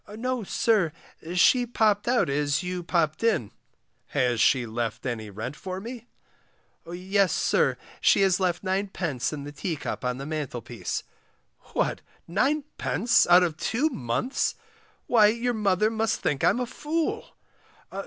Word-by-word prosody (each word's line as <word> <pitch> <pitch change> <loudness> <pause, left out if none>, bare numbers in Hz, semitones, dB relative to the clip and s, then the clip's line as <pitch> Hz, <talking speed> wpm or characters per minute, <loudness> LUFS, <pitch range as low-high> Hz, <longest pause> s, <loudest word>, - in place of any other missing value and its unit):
No, 250 +1 -2
sir, 200 -4 +2 0.4
she 245 +7 +5
popped 215 -3 +1
out 245 0 +3
as 145 +3 0
you 180 0 -3
popped 165 -1 0
in. 215 - +1 0.6
Has 125 -4 +1
she 130 -3 +4
left 115 +1 -4
any 115 -4 -3
rent 110 +7 -6
for 185 +3 -6
me? 235 +3 -8 0.8
Yes, 190 +2 +1
sir, - - +2 0.2
she - - +4
has 190 -1 +3
left 185 0 -1
9d. 185 -8 -1
in 150 -2 -5
the 145 - -7
teacup 150 0 -4
on 125 0 -1
the 135 - -6
mantlepiece. 145 -6 -4 0.7
What, - - 0 0.3
9d. 265 - +1
out 180 +1 +8
of 165 -3 -1
two 265 - 0
months. 135 - -1 0.5
Why 220 -4 +5
your 235 +3 0
mother 210 -1 +2
must 225 0 0
think 140 -3 -1
I'm - - +3
a 250 - 0
fool. 325 - -3
185 Hz, 140 wpm, -26 LUFS, 145-230 Hz, 0.8 s, out